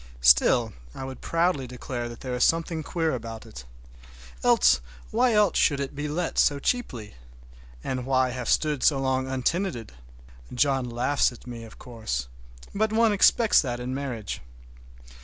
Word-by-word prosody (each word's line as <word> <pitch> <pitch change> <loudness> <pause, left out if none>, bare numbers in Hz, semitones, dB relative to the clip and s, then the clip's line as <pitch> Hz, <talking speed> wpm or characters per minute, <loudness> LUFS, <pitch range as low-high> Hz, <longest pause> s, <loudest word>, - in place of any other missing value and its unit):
Still 65 - +5 0.2
I - - -6
will 130 0 -5
proudly 165 -2 0
declare 125 -1 -5
that 120 - -11
there 130 -1 -4
is 125 0 +1
something 165 0 +1
queer 160 0 -1
about 115 -2 -6
it. - - -11 0.8
Else, 65 0 +4 0.3
why 225 -3 +4
should 140 -2 +2
it 140 -1 -4
be 145 +1 -4
let 165 +3 -2
so 145 - +4
cheaply? 135 - -3 0.7
And 130 -1 -3
why 130 -1 +2
have 125 -1 -4
stood 150 -4 +1
so 145 - +4
long 130 -1 0
untenanted? 130 - -2 0.6
John 135 -1 +1
laughs 125 +5 +1
at 120 - -14
me, 120 -2 -8
of 110 - -14
course, 110 - -5 0.5
but 215 +1 0
one 225 -1 +3
expects 215 +2 +5
that 120 -4 -4
in 125 +1 -4
marriage. 125 -7 -5
130 Hz, 155 wpm, -26 LUFS, 120-160 Hz, 0.8 s, Still